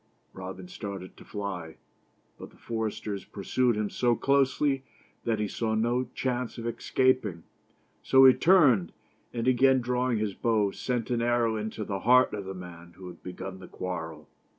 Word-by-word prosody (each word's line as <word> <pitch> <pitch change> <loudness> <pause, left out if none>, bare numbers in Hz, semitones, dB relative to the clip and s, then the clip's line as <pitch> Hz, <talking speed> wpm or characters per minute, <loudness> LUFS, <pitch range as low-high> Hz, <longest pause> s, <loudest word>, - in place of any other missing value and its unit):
Robin 95 - -8
started 100 - -7
to - - -14
fly, 95 -6 -5 0.6
but - - -9
the - - -22
foresters 110 -3 -4
pursued 120 +4 0
him 105 -1 0
so 120 +3 +1
closely 140 +1 +2 0.4
that 115 -2 +1
he 105 0 -1
saw 110 +2 -2
no 120 +3 +1
chance 125 -2 -2
of 115 - -6
escaping, 120 -6 +1 0.6
so 135 0 +6
he 130 - +9
turned, 140 - +4 0.4
and 120 0 -3
again 130 +1 +5
drawing 125 0 0
his 105 -2 -1
bow, 110 -3 +1
sent 125 +1 -3
an 120 -1 +1
arrow 120 -1 +2
into 110 0 -4
the 100 -1 -3
heart 125 +4 +5
of 100 -2 -4
the 95 0 -6
man 85 -1 -10
who 95 - -12
had 85 - -13
begun 95 +1 -7
the 95 - -11
quarrel. 80 -4 -6
110 Hz, 165 wpm, -28 LUFS, 95-125 Hz, 0.6 s, he